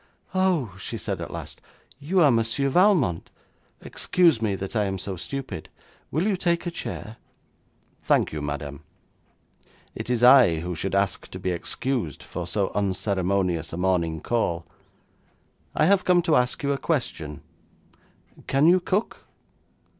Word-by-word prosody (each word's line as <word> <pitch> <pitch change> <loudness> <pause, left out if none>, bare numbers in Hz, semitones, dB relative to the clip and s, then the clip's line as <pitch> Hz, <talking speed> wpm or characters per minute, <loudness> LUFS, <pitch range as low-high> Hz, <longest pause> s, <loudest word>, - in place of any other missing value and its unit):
'Oh,' 180 - +1
she - - -5
said - - -4
at - - -5
last, - - -8 0.4
'you 175 +6 +1
are 145 -4 +6
Monsieur 115 +4 +1
Valmont. 165 - +3 0.5
Excuse 170 -10 +2
me 105 -3 0
that 95 +3 -6
I 105 -2 +2
am 95 -1 -2
so 95 +1 -5
stupid. 130 - -6 0.4
Will 160 +6 0
you 210 -2 +2
take 170 -1 0
a 175 - -2
chair?' 115 -8 -6 0.8
'Thank - - +2
you, 75 - -4
madam. 75 -1 -5 1.1
It - - -6
is 120 -1 +1
I 125 -11 +7
who 90 +1 -4
should 95 +4 -3
ask 100 -1 0
to - - -7
be 95 - -1
excused 90 - -3
for 90 -1 -6
so 100 +2 -1
unceremonious 95 -4 0
a - - -4
morning 85 -4 0
call. 85 -8 -1 1.1
I 155 - +3
have 195 +2 +4
come 175 -1 +3
to 165 -3 +3
ask 125 +2 +1
you 140 - +1
a 140 - -1
question. 80 - -2 1.1
Can 135 +2 +3
you 180 +3 +6
cook?' 195 +4 -2
115 Hz, 150 wpm, -25 LUFS, -, 1.1 s, I